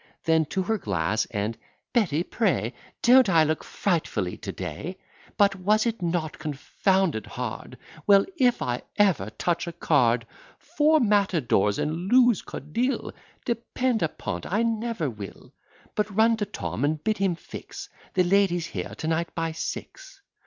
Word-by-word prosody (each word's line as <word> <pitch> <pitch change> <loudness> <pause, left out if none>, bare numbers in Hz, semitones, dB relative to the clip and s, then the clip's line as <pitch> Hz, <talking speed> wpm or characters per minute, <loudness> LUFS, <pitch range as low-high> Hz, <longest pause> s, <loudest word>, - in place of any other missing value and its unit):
Then 160 -1 +3
to 190 +5 -2
her 220 +3 0
glass; 100 - 0
and, 105 +1 -2 0.4
"Betty, 175 - +2
pray, 155 - 0 0.3
Don't 250 -2 +7
I 165 -3 +5
look 155 0 -1
frightfully 155 - -1
to - - -6
day? 160 - -6 0.4
But 200 -1 +4
was 210 +4 +2
it 230 -3 -1
not 170 -3 -2
confounded 155 - 0
hard? - - -6 0.3
Well, 200 -1 +6
if 250 -6 +2
I 125 0 -2 0.2
ever 185 - +3
touch 170 +12 -1
a - - -3
card! 125 -8 +2 0.3
Four 310 0 +2
matadores, 175 - +2
and 165 +5 -2
lose 245 -5 +5
codille! 235 - -3 0.3
Depend 235 0 -1
upon't, 160 - -3
I 210 +4 +2
never 230 -6 -1
will. 105 -6 -9 0.4
But 210 0 0
run 220 +3 +4
to 205 -2 -2
Tom, 190 - -4
and 150 +1 0
bid 215 -1 0
him 195 -3 +1
fix - - -9 0.3
The 185 - +4
ladies 175 -2 +2
here 95 - -5
to 155 - -5
night 165 +1 -1
by 165 -1 -1
six." - - -7
180 Hz, 150 wpm, -26 LUFS, 150-215 Hz, 0.4 s, Don't